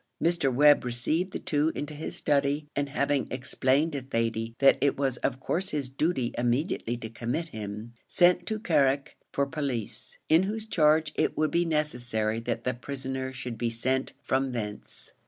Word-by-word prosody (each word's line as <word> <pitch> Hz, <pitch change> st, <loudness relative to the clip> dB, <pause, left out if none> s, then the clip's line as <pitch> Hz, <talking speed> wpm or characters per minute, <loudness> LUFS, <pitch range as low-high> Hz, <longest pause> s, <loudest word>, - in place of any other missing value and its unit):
Mr. 170 Hz, -5 st, +2 dB
Webb 145 Hz, +3 st, +6 dB
received 125 Hz, +9 st, 0 dB
the -, -, -3 dB
two 150 Hz, +1 st, +1 dB
into 145 Hz, +1 st, -4 dB
his 150 Hz, +2 st, -5 dB
study, 145 Hz, +1 st, +1 dB
and 140 Hz, 0 st, -1 dB
having 140 Hz, -1 st, 0 dB
explained 130 Hz, +4 st, +1 dB
to 140 Hz, -2 st, -3 dB
Thady 115 Hz, -2 st, -2 dB
that 135 Hz, 0 st, +5 dB
it 140 Hz, -, +2 dB
was 135 Hz, -3 st, 0 dB
of 130 Hz, 0 st, -1 dB
course 185 Hz, +7 st, -1 dB
his 145 Hz, -4 st, -2 dB
duty 135 Hz, -2 st, 0 dB
immediately 120 Hz, 0 st, 0 dB
to 115 Hz, -, -6 dB
commit 125 Hz, +9 st, -3 dB
him, 105 Hz, 0 st, -7 dB
sent 175 Hz, 0 st, +4 dB
to 220 Hz, -, -1 dB
Carrick 140 Hz, -8 st, +1 dB, 0.2 s
for 140 Hz, -, +1 dB
police, 140 Hz, -7 st, -4 dB
in 160 Hz, +2 st, +5 dB
whose 215 Hz, +3 st, -2 dB
charge 155 Hz, -5 st, +3 dB
it -, -, 0 dB
would 155 Hz, 0 st, +1 dB
be 175 Hz, 0 st, +2 dB
necessary 120 Hz, -8 st, -1 dB
that 115 Hz, 0 st, -3 dB
the 125 Hz, -, 0 dB
prisoner 130 Hz, +1 st, -4 dB
should 125 Hz, -3 st, -6 dB
be 120 Hz, -, 0 dB
sent 130 Hz, +3 st, -1 dB
from 135 Hz, -1 st, 0 dB
thence. 105 Hz, -3 st, -6 dB
135 Hz, 175 wpm, -28 LUFS, 120-155 Hz, 0.2 s, Webb